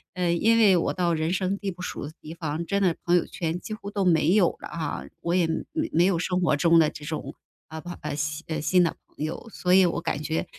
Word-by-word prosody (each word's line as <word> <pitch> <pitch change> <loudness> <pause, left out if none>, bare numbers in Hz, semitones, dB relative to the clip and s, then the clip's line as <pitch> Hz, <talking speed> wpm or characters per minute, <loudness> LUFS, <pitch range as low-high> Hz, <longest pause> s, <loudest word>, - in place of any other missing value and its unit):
嗯。 175 -1 +1
因 230 +1 +4
为 205 -4 +6
我 - - 0
到 175 -2 +1
人 160 +1 0
生 190 +1 0
地 200 -1 -3
不 180 +1 -11
熟 160 - -5
的 - - -9
地 155 +2 -8
方， 160 0 -3
真 200 +2 0
的 175 -3 +2
朋 175 +1 +4
友 - - 0
圈 165 0 -3
几 215 - -7
乎 210 -2 -7
都 200 -1 -1
没 165 -1 +4
有 195 -5 +4
了 - - -7
啊， 165 -2 -4 0.2
我 170 - -1
也 175 -3 +3 0.5
没 170 +3 +4
有 180 -4 +2
生 180 0 0
活 155 -4 +3
中 170 +1 +5
的 155 - +4
这 150 - -10
种， 155 -2 -5 0.4
呃 160 0 -6
朋， 175 +2 -7
呃 - - -4
新 150 +2 -3
呃， 160 -2 -3
新 180 +3 +4
的 165 - 0
朋 150 - -5
友。 165 +8 -6
所 180 0 0
以 190 -1 +7
我 170 - -1
感 145 - -2
觉 160 +1 -1
170 Hz, 280 characters per minute, -26 LUFS, 160-185 Hz, 0.5 s, 以